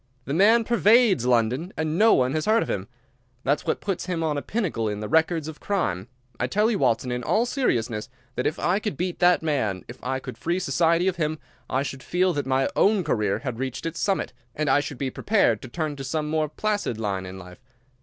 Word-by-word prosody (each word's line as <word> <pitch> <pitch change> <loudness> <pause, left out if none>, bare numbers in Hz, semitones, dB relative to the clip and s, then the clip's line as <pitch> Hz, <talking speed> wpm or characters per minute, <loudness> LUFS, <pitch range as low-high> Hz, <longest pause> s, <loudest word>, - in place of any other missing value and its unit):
"The 140 - -3
man 220 +7 +5
pervades 225 - +4
London, 125 - +1
and 155 0 -1
no 220 +5 +5
one 130 +1 +2
has 155 +3 -1
heard 225 +1 +4
of - - -8
him. 95 0 -3 0.6
That's 145 +2 0
what - - 0
puts 190 -3 -3
him 170 -3 -1
on 155 -2 0
a 145 - -2
pinnacle 160 - -2
in 105 0 -4
the 105 - -4
records 160 +2 +2
of 160 -1 -8
crime. 105 - -1 0.3
I 125 - 0
tell 210 - +2
you, 205 - 0
Watson, 120 +2 +1
in 125 0 -2
all 220 - +2
seriousness, 120 - -1 0.2
that 125 - -1
if 155 - -2
I 185 +4 +1
could 210 -9 -4
beat 180 0 -3
that 175 -1 +4
man, 110 - -1
if 120 - -11
I 130 +1 -1
could 130 -1 -8
free 170 +2 0
society 170 -1 +2
of 185 -2 0
him, 155 -1 -1 0.3
I 130 +2 +1
should 135 -2 -6
feel 180 +5 +1
that 145 -3 -2
my 135 0 +2
own 200 -2 +3
career 105 -10 0
had 125 -3 -3
reached 130 +1 -4
its 165 0 -4
summit, 195 -2 0 0.2
and 150 -2 0
I 145 - +5
should 145 -2 -5
be 135 0 -2
prepared 160 - +2
to - - -8
turn 155 +3 -3
to 135 - -6
some 150 +3 -2
more 155 -1 0
placid 205 - -2
line 95 -3 -2
in 95 +1 -8
life. 90 -1 -12
155 Hz, 230 wpm, -25 LUFS, 125-185 Hz, 0.6 s, man